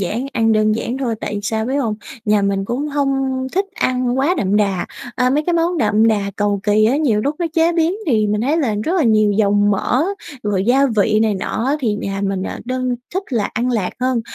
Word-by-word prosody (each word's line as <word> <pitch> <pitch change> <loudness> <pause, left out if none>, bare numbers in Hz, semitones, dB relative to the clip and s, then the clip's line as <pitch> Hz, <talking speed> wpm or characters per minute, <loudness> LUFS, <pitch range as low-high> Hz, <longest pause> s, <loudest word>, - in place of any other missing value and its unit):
giản, 225 +7 -2
ăn 225 0 +2
đơn 215 0 +3
giản 235 +3 -3
thôi, 245 -4 -1
tại - - -4
vì 205 - -3
sao 220 +1 -1
biết 265 - -2
hông? 235 -7 0 0.3
Nhà 210 -1 +2
mình 200 0 0
cũng 255 +8 -2
hông 270 -2 -1
thích 390 +2 +1
ăn 250 0 0
quá 295 +7 +2
đậm 200 +1 +1
đà, 200 -4 0 0.3
à, 250 -1 +2
mấy 290 +3 +1
cái 350 - +1
món 340 +1 +1
đậm 220 -6 +3
đà 205 -2 0
cầu 205 -1 0
kì 210 +1 +3
á 240 +6 +3
nhiều 255 -9 +1
lúc 285 +7 -1
nó 345 - 0
chế 330 +1 +3
biến 335 +1 +1
thì 220 -7 +2
mình 210 0 0
thấy 280 +7 +1
là 255 -10 0
rất 335 - 0
là 320 - +2
nhiều 215 -2 +3
dầu 205 0 +2
mỡ, 205 +5 +2 0.4
rồi 200 -2 0
gia 270 +5 +4
vị 215 +1 +3
này 220 -2 +1
nọ 200 +4 -3
á 280 +2 +1
thì 225 -6 0
nhà 195 -1 -4
mình, 195 -1 -1
à, - - -5
đơn 255 0 -2 0.2
thích 380 - 0
là 220 -4 0
ăn 245 +3 0
lạt 215 -7 0
hơn. 255 -1 +1
230 Hz, 245 wpm, -18 LUFS, 210-270 Hz, 0.4 s, gia